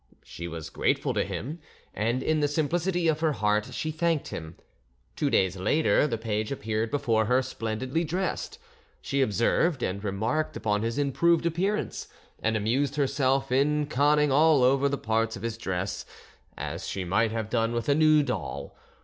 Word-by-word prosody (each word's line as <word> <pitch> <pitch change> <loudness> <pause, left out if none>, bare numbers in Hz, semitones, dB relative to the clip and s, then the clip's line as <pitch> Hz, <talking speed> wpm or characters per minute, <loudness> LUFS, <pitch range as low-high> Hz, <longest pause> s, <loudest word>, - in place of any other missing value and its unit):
She 85 - -7
was 80 -2 -7
grateful - - 0
to - - +1
him, 150 +9 -5 0.3
and 115 +5 -1
in 155 0 +1
the 145 - +2
simplicity 170 +4 0
of 155 -1 +2
her 160 -2 +1
heart 105 -3 +1
she 155 - -3
thanked 160 -1 0
him. 80 -1 -7 0.6
Two - - 0
days 95 0 +2
later 150 +10 +2
the 115 - -2
page 110 0 -2
appeared 110 -3 -2
before 115 -5 +1
her 125 +4 +2
splendidly 130 +5 -2
dressed; 180 +3 -3 0.4
she 140 - -1
observed 130 - +1
and 100 +2 -2
remarked 110 +10 -1
upon 105 -1 0
his 115 +2 -2
improved 155 +5 +2
appearance, 185 +6 -1 0.3
and 110 0 +1
amused 130 +6 0
herself 135 -1 +1
in 150 +3 +2
conning 150 +1 +3
over - - +3
all 140 -3 +4
the 140 - -1
parts 115 0 0
of 100 - -9
his 115 -1 -2
dress, 95 -3 -3 0.5
as - - -5
she 95 - -3
might 95 +6 +2
have 110 -1 -3
done 115 -1 +1
with 120 -1 -2
a 145 - +4
new 155 0 +5
doll. 70 - -4
130 Hz, 170 wpm, -27 LUFS, 110-150 Hz, 0.6 s, new